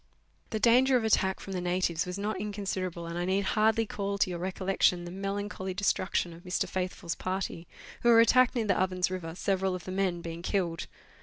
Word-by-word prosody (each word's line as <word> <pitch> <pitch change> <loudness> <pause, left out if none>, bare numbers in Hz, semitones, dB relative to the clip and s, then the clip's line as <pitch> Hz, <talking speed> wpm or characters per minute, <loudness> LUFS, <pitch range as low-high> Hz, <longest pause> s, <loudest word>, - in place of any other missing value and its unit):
The 220 - -2
danger 250 +4 +5
of 235 - -1
attack 190 -3 +2
from 195 - -7
the 180 - -2
natives 175 -1 0
was 180 +1 -4
not 210 +2 -2
inconsiderable, 190 -4 -3
and 170 +1 -4
I 175 - -1
need 190 +2 +1
hardly 220 +2 +2
call 200 -1 -3
to 190 - +2
your 175 - -4
recollection 185 -1 +1
the 175 - -7
melancholy 195 0 -4
destruction 185 -3 0
of 165 - -12
Mr. 180 +1 -1
Faithfull's 180 -2 -3
party, 185 -2 -4 0.3
who 240 - +3
were 230 -1 +8
attacked 255 +2 +5
near 230 -3 0
the 195 -3 +2
Ovens 185 -1 0
River, 170 -3 -5
several 190 0 0
of 180 - -7
the 185 - -5
men 185 -2 0
being 165 0 -6
killed. 175 -3 -1
190 Hz, 205 wpm, -29 LUFS, 180-205 Hz, 0.3 s, were